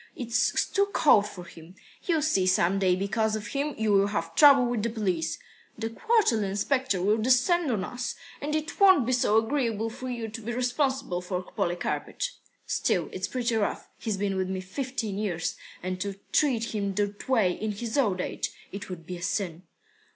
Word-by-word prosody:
It's 240 -1 +1
too 400 0 +1
cold 210 -8 +5
for 180 -3 -9
him. 170 +1 -13 0.3
You'll 325 -4 +2
see, 195 -12 +2
some 185 +1 +3
day, 185 -2 +3
because 215 +3 0
of 215 0 -5
him, 285 +1 -2
you 220 -1 +1
will 200 0 +4
have 165 -5 -3
trouble 275 - +7
with 240 -2 -1
the 230 - 0
police. 185 -8 -1 0.4
The 225 0 -3
quarterly 325 - +2
inspector 205 +2 0
will 210 +3 +3
descend 260 +8 +3
on 205 -5 0
us, 245 +5 -4 0.3
and 300 +2 -2
it 310 0 -3
won't 375 - +6
be 255 - 0
so 240 -4 +3
agreeable 225 -2 0
for 255 +2 -6
you 235 -2 -3
to 220 +1 -7
be 235 +2 -4
responsible 255 - 0
for 180 0 -3
Polikarpych." 180 - -2 0.3
"Still, - - 0
it's - - -2
pretty 240 -2 -1
rough. 210 -2 -1
He's 215 -4 -2
been 195 -1 -1
with 185 0 -1
me 190 0 -2
fifteen 220 +1 -4
years. 175 -6 -2 0.3
And 185 0 -3
to 200 0 -3 0.2
treat 240 -7 +1
him 200 -2 -2
that 205 +3 -2
way 220 -8 +4
in 215 +4 -3
his 220 +2 -5
old 205 -10 +2
age - - -3 0.2
it 200 0 -7
would 170 -3 -7
be 180 +1 -6
a - - -11
sin." 180 -2 -3
220 Hz, 190 wpm, -27 LUFS, 190-255 Hz, 0.4 s, trouble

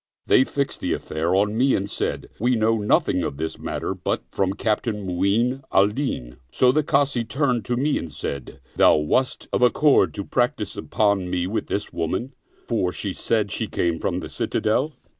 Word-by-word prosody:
They 130 - +5
fixed 140 0 -2
the - - -1
affair 80 +4 -1
on 105 +2 +2
me 130 +3 +3
and 100 - -1
said, - - -3
" - - -32
We 120 +3 +2
know 110 0 +2
nothing 105 - +2
of 70 - -3
this 80 +1 -4
matter - - -3
but - - -2
from 95 -1 0
Captain 105 -1 -1
Mu'in 105 +8 +1
al 100 +2 +5
Din." 105 - -4
So 125 -1 +4
the 155 +4 +2
Kazi 140 -4 +1
turned 125 -2 0
to 120 - -1
me 145 +3 +1
and 80 - -7
said, 70 -2 -6
" - - -32
Thou - - +6
wast 80 +12 0
of - - +1
accord 140 +4 +4
to 100 -2 -4
practice 120 -5 -1
upon 100 -2 0
me 90 -1 -1
with 105 +5 -2
this 105 - -3
woman, 95 - -2 0.3
for 105 -7 0
she 100 +1 -3
said 105 -1 0
she - - -2
came 85 -2 -1
from 90 -1 -1
the - - -7
Citadel." 130 +8 0
105 Hz, 195 wpm, -23 LUFS, 95-125 Hz, 0.3 s, Thou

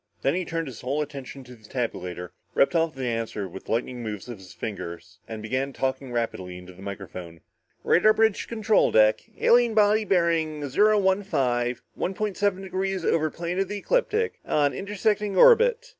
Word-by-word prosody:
Then 135 - +2
he 180 +1 -1
turned 165 0 -3
his 130 -6 -9
whole 140 +4 -1
attention 140 -2 -9
to 125 0 -13
the 110 -2 -18
tabulator, 90 -8 -4 0.2
ripped 140 - +3
off 165 -2 +1
the 130 -1 -4
answer 115 -4 -3
with 95 +2 -11
lightning 120 +2 -2
moves 105 -2 -6
of 120 -4 -8
his 95 -2 -13
fingers 90 -4 -7
and 110 -1 -7
began 130 +4 -2
talking 130 0 -2
rapidly 95 -7 -3
into 90 0 -12
the 90 - -15
microphone. 90 -4 -8 0.4
"Radar 215 +5 +5
bridge 220 -1 +2
to - - -8
control 220 -2 +2
deck! 110 0 +4 0.2
Alien 240 -2 +4
body 215 0 +4
bearing 165 -6 +1
zero 210 +9 +4
one 190 0 +2
five, 125 - -1
one 190 - -3
point 210 -2 -2
seven 200 -2 0
degrees 190 -1 -2
over 155 -1 +2
plane 170 +3 -4
of 195 - +1
the 205 +2 -4
ecliptic. 455 - 0
On 145 -1 +1
intersecting 205 0 -1
orbit. 480 - +5
150 Hz, 185 wpm, -25 LUFS, -, 0.4 s, Radar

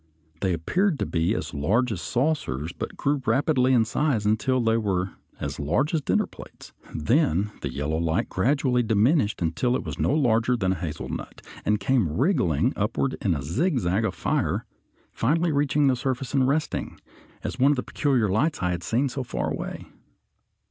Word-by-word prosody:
They 95 0 +1
appeared 170 - +1
to - - -1
be 85 0 0
as - - -4
large 105 - +1
as 95 -6 -3
saucers, 100 - -1
but - - -6
grew 140 0 0
rapidly 130 +2 +2
in 120 -3 +4
size 120 -3 0
until 120 +5 +2
they 115 -2 +2
were 95 -4 -1 0.3
as - - -4
large 90 - 0
as 160 - +1
dinner - - +1
plates, - - -13 0.2
then 105 - +1
the - - -3
yellow 75 +3 -2
light 80 0 0
gradually 125 +4 +1
diminished 110 - +2
until 105 +10 +1
it - - -2
was - - -6
not 145 - +2
larger 120 -3 +2
than 95 -4 +1
a - - 0
hazelnut, 80 -4 -6 0.2
and 105 0 +2
came 110 - +1
wriggling 125 - +2
upward 115 +6 -1
in 95 -5 +1
a 70 - -4
zigzag 110 - 0
of 95 -5 -1
fire, - - -1 0.5
finally 165 +7 +1
reaching 145 0 +2
the 135 -2 +4
surface 130 +1 -3
and 135 -2 +3
resting, 150 +2 -1 0.4
as 130 - -4
one 135 +3 +5
of - - +2
the 125 - -2
peculiar 135 -7 +1
lights 135 - +1
I 90 - +1
had 85 -1 -3
seen 120 - +1
so 135 +1 -4
far 65 - -3
away. - - -5
120 Hz, 180 wpm, -25 LUFS, 95-140 Hz, 0.5 s, one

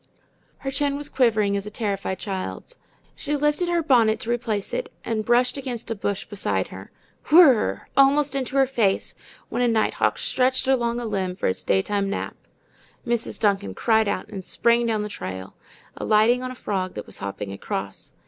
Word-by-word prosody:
Her 270 - -1
chin 280 0 0
was 290 0 -4
quivering 215 -5 +2
as 200 +1 -3
a - - -4
terrified 200 -3 -2
child's. 195 - -5 0.4
She 295 0 -2
lifted 295 +4 +1
her 340 -1 +1
bonnet 235 -7 +4
to 230 - -2
replace 230 -4 -2
it - - -3
and 220 -2 -1
brushed 245 +4 +2
against 245 -4 -5
a - - +2
bush 200 -1 -3
beside 100 - -2
her. 95 +1 -10 0.4
WHIRR, 300 -8 +5
almost 275 +1 +4
into 270 -1 -2
her 270 -1 +5
face, 230 -7 0 0.4
went 245 - 0
a - - +3
nighthawk 225 -2 +1
stretched 260 +1 +1
along 240 -3 +1
a 240 - -4
limb 190 -4 -2
for - - -4
its 95 - -1
daytime 195 - +1
nap. 200 - -3 0.7
Mrs. 235 -1 -2
Duncan 195 - +1
cried 220 -1 +2
out 200 -2 -2
and 200 -3 -7
sprang 235 +4 +2
down 215 -2 0
the - - -3
trail, 95 - -7 0.4
alighting 220 +4 +3
on 255 - -4
a 255 - -7
frog 190 -6 -3
that 105 - -6
was - - -12
hopping 100 0 -5
across. 100 0 -5
225 Hz, 180 wpm, -24 LUFS, 200-260 Hz, 0.7 s, WHIRR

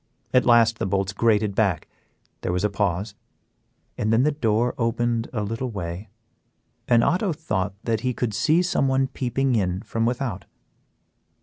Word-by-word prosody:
At 125 -1 +4
last 115 -2 +5
the - - -1
bolts 95 +1 -1
grated 105 -1 +2
back, 95 -6 0 0.5
there - - -2
was 90 +1 -1
a 105 - +1
pause, 100 0 -1 0.9
and 110 - +1
then 115 +3 +4
the 150 - +3
door 120 -4 +1
opened 115 0 0
a 105 -4 -2
little 115 +5 -3
way, 95 -1 -6 0.8
and 120 -1 +4
Otto 180 0 +1
thought 100 - -2
that 115 -2 0
he 125 +3 -1
could 120 -3 -2
see 160 - +3
someone 135 -6 +1
peeping 130 0 -1
in 95 -2 -1
from 115 0 -1
without. 120 -5 -3
115 Hz, 160 wpm, -24 LUFS, 100-125 Hz, 0.9 s, last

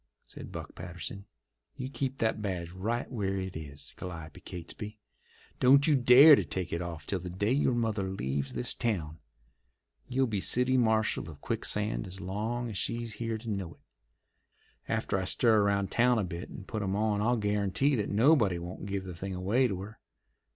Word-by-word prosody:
said - - -10
Buck - - -7
Patterson. 90 +2 -7 0.5
"You 130 - -4
keep 135 -1 -2
that 110 -2 0
badge 90 -5 -3
right 110 +7 -2
where 100 -5 -1
it 95 -1 -4
is, 75 -2 -8
Calliope 85 0 -8
Catesby. 100 +4 -7 0.6
Don't 140 +3 +6
you 155 - +4
dare 135 +4 +9
to - - 0
take 90 -2 -3
it 85 - -1
off 85 -4 -6
till 95 - -2
the 90 +1 -6
day 100 +5 -1
your 130 -2 +2
mother 110 -5 0
leaves 70 -6 -2
this 120 - -3
town. 85 -10 -2 0.9
You'll 130 +1 +2
be 105 -5 -2
city 125 +4 +3
marshal 110 -7 +2
of 75 -3 -11
Quicksand 105 +6 -1
as 95 +1 -8
long 110 +6 -3
as 100 - -3
she's 115 -1 -2
here 115 -1 -1
to 110 - -11
know 100 -6 -3
it. - - -31 1.1
After 95 - 0
I - - -2
stir 110 +2 +4
around 100 -1 +1
town 125 0 +4
a 110 - +1
bit 85 -1 -6
and 95 - -9
put 110 - -4
'em 95 -1 -1
on 105 -1 +1
I'll 120 +3 +2
guarantee 105 +6 +1
that 105 - -1
nobody 110 - +4
won't 90 +3 -7
give 100 -1 -2
the 95 -1 -7
thing 95 +2 -5
away 105 +8 +2
to 95 -5 -4
her. 105 +4 -9
100 Hz, 185 wpm, -30 LUFS, 90-120 Hz, 1.1 s, dare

